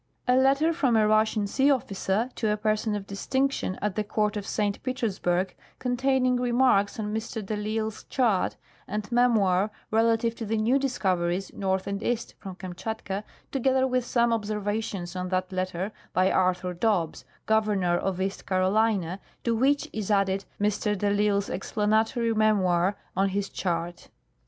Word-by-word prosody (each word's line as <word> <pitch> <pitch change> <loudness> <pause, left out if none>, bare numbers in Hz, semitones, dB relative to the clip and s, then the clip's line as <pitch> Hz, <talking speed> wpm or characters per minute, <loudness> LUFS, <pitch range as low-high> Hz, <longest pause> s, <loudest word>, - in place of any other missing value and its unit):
"A 250 - +4
letter 275 +5 +4
from 265 -8 +2
a 215 -1 +4
Russian 215 0 +2
Sea 270 +7 +2
Officer 225 -2 0
to 220 - -1
a 210 - +1
Person 215 0 0
of 200 -1 -4
Distinc 265 +8 0
tion 185 -8 -3
at 210 -2 0
the 215 - -1
Court 210 0 0
of 205 -1 -4
St. 205 -2 -1
Petersburg, 195 -8 -1 0.2
containing 255 0 +1
Remarks 245 -5 +2
on 210 -1 -3
Mr. 220 -1 -4
de 215 - -2
risle's 215 +1 -3
Chart 225 -8 +1 0.3
and 210 +2 -4
Memoir 215 -5 +3 0.2
relative 225 +1 +2
to 225 - -4
the 225 +1 0
New 235 +6 +3
Discoveries 190 -8 -1
North 190 -1 -1
and 200 0 -3
East 235 0 -2
from 190 -3 -8
Kamtschatka, 195 +2 -5 0.3
together 265 0 +2
with 255 -1 +1
some 235 0 +2
Observa 210 -1 -1
tions 185 -5 -5
on 180 0 -3
that 185 0 -1
Letter 185 +1 -2 0.2
by 185 +1 +3
Arthur 180 -1 +1
Dobbs, 175 -4 0 0.2
Governor 210 -5 +2
of 185 +1 -1
East 195 +1 -3
Carolina, 190 -1 +1 0.2
to 235 -1 +1
which 275 +5 +2
is 215 -2 -4
added 195 -1 +1
Mr. 210 0 0
de 205 +1 +1
ITsle's 205 -1 +2
Explanatory 220 +4 0
Memoir 200 -3 +2 0.2
on 195 +1 +2
his 200 +1 -2
Chart." 175 -1 -3
210 Hz, 160 wpm, -27 LUFS, 190-230 Hz, 0.3 s, A